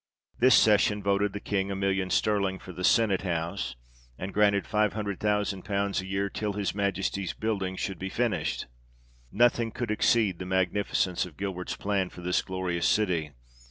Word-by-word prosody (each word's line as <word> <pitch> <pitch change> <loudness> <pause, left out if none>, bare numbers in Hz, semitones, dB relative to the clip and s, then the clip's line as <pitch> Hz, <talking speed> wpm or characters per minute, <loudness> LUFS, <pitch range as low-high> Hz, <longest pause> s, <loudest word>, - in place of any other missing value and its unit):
This 130 +1 +6
session 105 -1 +4
'voted 100 +1 +1
the 105 - -4
King 100 -1 -1
a 100 - -2
million 95 -1 0
sterling 100 -1 +1
for 90 - -10
the 90 - -6
senate 105 -2 +3
house, 85 +1 -3 0.4
and 95 +1 -5
granted 100 -1 +3
five 105 -1 +1
hundred 100 -3 -3
thousand 105 -2 0
pounds 100 -1 -1
a 95 - -9
year 100 +1 -1
till 105 +1 -3
Ms 100 -1 -2
Majesty's 100 -2 -1
building 100 -4 -2
should 95 -2 -4
be 95 - -4
finislied. 115 -3 -1 0.7
Nothing 120 0 +3
could 115 0 -4
exceed 105 -4 +2
the 90 - -5
magnificence 95 -1 0
of 80 - -16
Gilbert's 95 -2 -4
plan 100 -2 -1
for 90 - -11
this 90 +1 +1
glorious 90 -3 -1
city. 85 -8 +1
100 Hz, 170 wpm, -28 LUFS, 95-105 Hz, 0.7 s, This